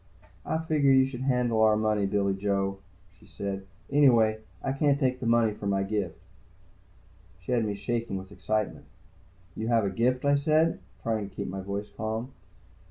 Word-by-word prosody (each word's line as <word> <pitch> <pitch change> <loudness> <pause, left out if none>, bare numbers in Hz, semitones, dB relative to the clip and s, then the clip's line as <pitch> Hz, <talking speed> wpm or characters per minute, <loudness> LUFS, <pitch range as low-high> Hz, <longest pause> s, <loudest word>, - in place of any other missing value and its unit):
"I 160 - +1
figured 150 -4 +3
you 130 - +6
should 130 -2 -6
handle 125 -4 +1
our 110 -1 +5
money, 105 -2 +1
Billy 100 0 +1
Joe," 100 0 -1 0.4
she 105 - -19
said. 100 -1 -5 0.2
"Anyway, 120 -7 +5 0.4
can't 140 -2 +3
take 130 -1 0
money 115 -2 +3
for 105 - -6
my 100 -1 +1
gift." 95 -4 -2 1.2
She - - -6
had 120 -3 +2
me 105 -1 -2
shaking 115 0 -2
with 95 0 -9
excitement. 110 +1 -2 0.7
"You 110 - -3
have 115 -3 +3
a 100 - -1
gift?" 125 +6 +1
I 145 0 +4
said, 155 +3 +2 0.2
trying 110 -3 -1
to 95 - -24
keep - - -4
my 95 +1 -4
voice 100 +2 -5
calm. 110 +4 -3
110 Hz, 165 wpm, -28 LUFS, 100-125 Hz, 1.2 s, you